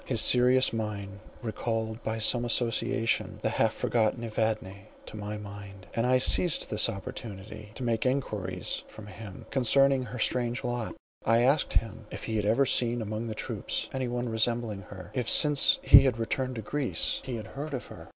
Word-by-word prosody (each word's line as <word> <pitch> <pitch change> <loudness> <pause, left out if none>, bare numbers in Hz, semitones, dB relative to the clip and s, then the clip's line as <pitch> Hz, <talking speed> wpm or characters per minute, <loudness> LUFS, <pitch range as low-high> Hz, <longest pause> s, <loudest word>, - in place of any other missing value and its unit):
His 120 -4 0
serious 125 +2 +4
mien 100 -3 -5 0.2
recalled, 110 0 -4
by 110 0 -3
some 120 +2 +4
association, 115 -1 -1
the - - +1
half - - +1
forgotten 115 0 -1
Evadne 110 -3 -3 0.2
to - - -10
my 105 0 -6
mind, 100 -2 -11
and 115 +2 -1
I 130 0 +3
seized 160 +6 +5
this 105 +2 +3
opportunity 105 0 -9
to 130 - -6
make 115 -2 -1
enquiries 105 -9 -3
from 110 - -13
him 105 -1 -11
concerning 135 +1 +3
her 125 - -8
strange 120 +2 -1
lot. 120 -2 -4 0.3
I 115 +1 +2
asked 140 +3 +1
him, 115 -1 -3
if - - -9
he 110 -1 -3
had 105 - -2
ever 120 +6 +2
seen 120 -1 +2
among 110 +1 -5
the 110 - -5
troops - - -4
any 130 -1 -3
one 120 0 -3
resembling 110 -2 -1
her; 90 -3 -11
if 125 -4 -2
since 150 -2 +6
he 135 - +8
had 125 -4 0
returned 130 +3 -3
to 110 - -6
Greece 145 +3 -1
he 130 - -5
had 110 - -7
heard 145 +1 -6
of 125 - -7
her? - - -13
115 Hz, 180 wpm, -27 LUFS, 105-125 Hz, 0.3 s, he